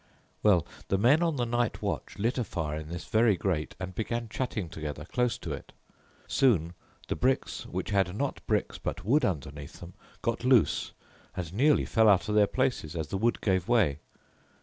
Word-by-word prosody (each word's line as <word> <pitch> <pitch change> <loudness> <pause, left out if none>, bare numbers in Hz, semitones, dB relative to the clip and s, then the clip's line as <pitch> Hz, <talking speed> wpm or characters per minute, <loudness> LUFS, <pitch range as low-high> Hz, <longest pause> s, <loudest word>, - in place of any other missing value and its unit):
"Well, 95 -6 +4 0.2
the 95 - +1
men 130 - +4
on 165 -3 +1
the 125 -3 0
night 120 0 -1
watch - - -3
lit 115 +5 0
a - - +1
fire 80 -7 -3
in 75 - -8
this 85 +1 -6
very 110 -2 +3
grate 85 -5 -2
and 95 0 -5
began 115 +3 -3
chatting 110 -6 -3
together 75 -2 -6
close 125 +6 0
to - - -6
it. - - -9 0.5
Soon 90 - +2 0.3
the - - -1
bricks 130 +1 0
which - - -4
had 95 -2 +1
not 140 +4 -2
bricks - - 0
but 90 - -4
wood 145 +8 +3
underneath 75 -5 -3
them 85 +1 -10 0.3
got 115 +1 -1
loose, 125 -3 +3 0.4
and 90 -2 -4
nearly 145 +8 +3
fell 110 -1 +4
out 100 -3 +4
of 105 - -1
their 105 -1 +5
places 80 -4 -1
as 80 -2 -3
the 95 - -2
wood 115 +3 +1
gave 95 -3 +1
way. 105 - +3
105 Hz, 190 wpm, -29 LUFS, 85-120 Hz, 0.5 s, their